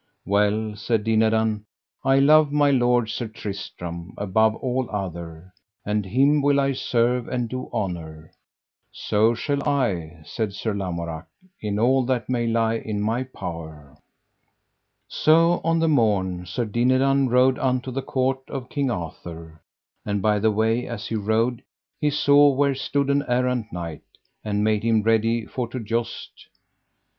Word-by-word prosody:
Well, 105 +2 +1
said 110 0 0
Dinadan, 110 -1 +1 0.4
I 135 0 +3
love 150 +2 +5
my 145 -1 +3
lord 120 -3 +2
Sir 120 - -3
Tristram, 90 -5 -7
above 110 +2 +2
all 130 0 -2
other, 85 -3 -6 0.3
and 105 0 0
him 140 +8 +3
will 140 0 +3
I 140 0 +1
serve 125 -1 0
and 125 -2 -2
do 130 +2 -6
honour. 80 -5 -5 0.6
So 110 +3 +1
shall 140 +4 -2
I, 90 - -1
said 105 +5 -3
Sir 105 +2 -3
Lamorak, 85 -5 -4 0.3
in 105 -1 -2
all 130 +4 +3
that 125 -2 -1
may 120 -2 0
lie 115 0 +1
in 110 -2 -4
my 110 +4 0
power. 80 - -8 1.1
So 165 +2 +3
on 165 0 +2
the 165 0 +2
morn 95 - +1
Sir 120 +7 -2
Dinadan 130 +4 +2
rode 125 +1 +3
unto 130 0 -1
the 135 +2 -3
court 130 -1 -1
of 130 -2 -6
King 140 -2 -1
Arthur; 80 -4 -7 0.4
and 105 -1 -1
by 105 +1 +2
the 110 +2 +3
way 110 +3 0
as 115 -3 -6
he 115 - -2
rode 110 +3 0 0.4
he 150 - +2
saw 145 0 +5
where 140 0 +2
stood 140 +1 -1
an 140 0 +2
errant 125 -2 0
knight, 85 -2 -6 0.4
and 105 -1 -1
made 105 -1 +2
him 110 -1 +2
ready 115 +1 +2
for 125 +3 -4
to 125 +2 -6
joust. 115 +1 -4
115 Hz, 150 wpm, -23 LUFS, 100-130 Hz, 1.1 s, love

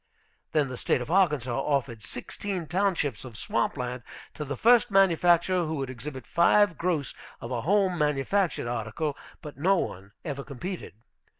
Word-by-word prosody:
Then 150 -3 +2
the 125 - -6
State - - +1
of 125 +5 -5
Arkansas 150 -10 +2
offered 135 -6 -1
sixteen 180 - -5
townships 175 - 0
of 120 -5 -10
swamp 115 +5 -1
land 125 0 -3 0.3
to 150 - -5
the 140 -2 -4
first 240 - +5
manufacturer 180 -2 +4
who 160 0 -2
would 135 -3 -3
exhibit 130 +1 -7
five 180 +2 +4
gross 165 -4 -1 0.3
of 115 - -7
a 120 -2 -1
home 185 - +2
manufactured 150 +2 +1
article. 120 +6 -2 0.3
But 150 - -9
no 190 +7 +3
one 100 - -4
ever 140 -2 -4
competed. 155 - -6
150 Hz, 160 wpm, -27 LUFS, 125-180 Hz, 0.3 s, first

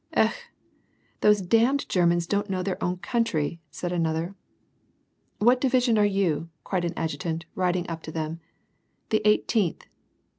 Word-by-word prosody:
" - - -8
Ekh! - - +4 0.9
these 210 -1 +5
damned 230 +9 +2
Germans 175 -1 +2
don't 205 +3 -1
know 185 -1 -1
their 190 -1 -3
own 180 +1 0
coun 235 +5 0
try," 165 -6 -2
said 175 - -4
another. 165 +1 -1 1.0
What 245 +4 +4
division 250 -4 +3
are - - +5 0.2
you? 165 -4 0
" - - -47
cried 180 -3 -1
an 170 0 -3
adjutant, 160 +1 -3
riding 180 -1 0
up 165 -1 -5
to - - -6
them. 160 +1 -4 0.4
" - - -46
The 215 - +3
Eighteenth." 210 -3 +1
180 Hz, 160 wpm, -26 LUFS, 165-210 Hz, 1.0 s, these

